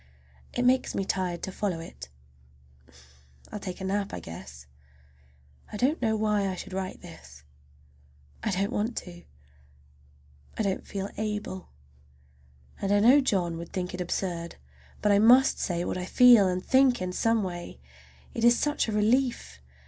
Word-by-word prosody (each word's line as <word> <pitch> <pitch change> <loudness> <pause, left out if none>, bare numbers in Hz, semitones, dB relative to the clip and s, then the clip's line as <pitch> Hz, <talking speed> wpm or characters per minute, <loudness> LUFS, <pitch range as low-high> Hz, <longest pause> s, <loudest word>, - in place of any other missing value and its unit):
It 245 - 0
makes 255 +1 +2
me 195 - -1
tired 180 -3 -2
to 190 - -3
follow 185 -3 -2
it. 65 - -10 0.8
I - - -21 0.6
will 210 - -5
take 185 -2 -6
a - - -6
nap, 200 +1 -2
I - - -5
guess. 70 -5 -10 1.1
I 210 - -5
don't 275 +8 +1
know 220 -2 +1
why 210 -2 +1
I 190 - -2
should 190 +1 -8
write 190 0 -4
this. 70 -4 -13 1.0
I - - -1
don't 195 +1 -1
want 225 +3 -2
to. 85 0 -7 1.3
I - - 0
don't 195 -2 -2
feel 195 0 -5
able. 210 -3 -4 1.1
And 195 - -1
I 205 - +4
know 250 +7 +6
John 180 -9 0
would 170 - -8
think 180 -1 -3
it 180 - -4
absurd. 175 -1 -3 0.5
But 210 - +4
I 200 - +5
must 245 +5 +5
say 175 -1 -1
what - - -3
I 180 - -4
feel 240 -1 +6
and 185 0 -2
think 260 -2 +4
in 185 0 -3
some 225 +2 +1
way—it 65 - -9
is 240 0 +6
such 295 -3 0
a - - -2
relief! 215 - 0
195 Hz, 165 wpm, -27 LUFS, 175-220 Hz, 1.3 s, know